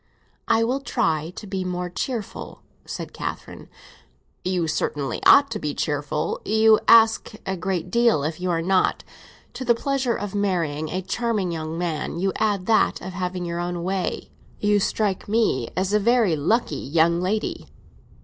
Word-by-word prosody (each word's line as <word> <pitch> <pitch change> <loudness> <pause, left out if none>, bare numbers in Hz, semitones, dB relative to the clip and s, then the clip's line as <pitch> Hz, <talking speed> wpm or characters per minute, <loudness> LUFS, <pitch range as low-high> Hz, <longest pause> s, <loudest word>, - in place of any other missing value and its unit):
"I 225 - +3
will 255 +4 0
try 165 - -1
and 210 - -10
be 190 -1 -3
more 180 0 -3
cheerful!" 215 +4 -5 0.2
said - - -6
Catherine. - - -6 0.7
"You 180 -2 0
certainly 145 -3 -2
ought 280 0 +7
to 215 - -3
be 150 -4 -3
cheerful, 150 0 -2
you 220 0 +4
ask 225 -1 +5
a 190 - -2
great 180 0 -3
deal 235 -10 +3
if 155 +3 -3
you 185 - -1
are 165 -1 0
not. 185 +1 +1 0.5
To - - -5
the 235 -1 +3
pleasure 265 -1 0
of 205 -1 -5
marrying 170 -7 -1
a 185 +1 -3
brilliant 215 -4 -1
young 160 0 -4
man, 170 -2 -3
you 190 +2 0
add 205 -4 0
that 220 0 +3
of 185 +1 -7
having 180 -1 -3
your 170 0 -3
own 175 0 -3
way; 185 0 -3 0.3
you 205 0 +3
strike 200 -1 -1
me 210 - +1
as 190 +2 0
a 210 - +4
very 225 -5 +3
lucky 215 +11 0
young 170 +4 +2
lady!" 210 +4 -2
185 Hz, 165 wpm, -23 LUFS, 170-220 Hz, 0.7 s, ought